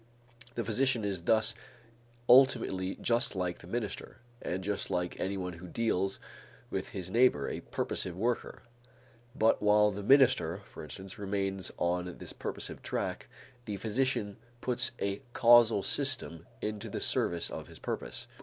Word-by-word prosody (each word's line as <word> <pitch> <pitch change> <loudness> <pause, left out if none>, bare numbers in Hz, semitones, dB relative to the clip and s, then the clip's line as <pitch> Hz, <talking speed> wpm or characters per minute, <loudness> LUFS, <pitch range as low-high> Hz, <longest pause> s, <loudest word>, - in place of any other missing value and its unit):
The 115 - -2
physician 120 0 +1
is 95 -3 -2
thus 110 +2 +4 0.7
ultimately 120 -7 +4
just 120 -1 +1
like 90 -1 -2
the - - -13
minister 110 +1 -4 0.2
and 95 +2 -3
just 100 +1 -2
like 90 0 -1
anyone 95 -2 -2
who 85 +2 -10
deals 95 -2 0 0.5
with - - -3
his 95 -1 -6
neighbor, 115 - +4
a - - -3
purposive 90 -1 -3
worker; 115 -1 -2 0.7
but 110 +1 +3
while 105 0 +5
the 100 +1 -5
minister, 115 - +4
for - - -10
instance, 95 +7 -8
remains 95 -1 -2
on 90 0 -1
this - - -8
purposive - - -5
track, - - -3 0.4
the 105 -2 -4
physician 110 -2 -1 0.2
puts 125 +1 +1
a 100 +2 -2
causal 115 -4 +6
system 130 - 0 0.2
into 105 -1 -3
the - - -4
service 85 -1 0
of - - -6
his - - -13
purpose. - - -4
100 Hz, 145 wpm, -31 LUFS, 95-115 Hz, 0.7 s, causal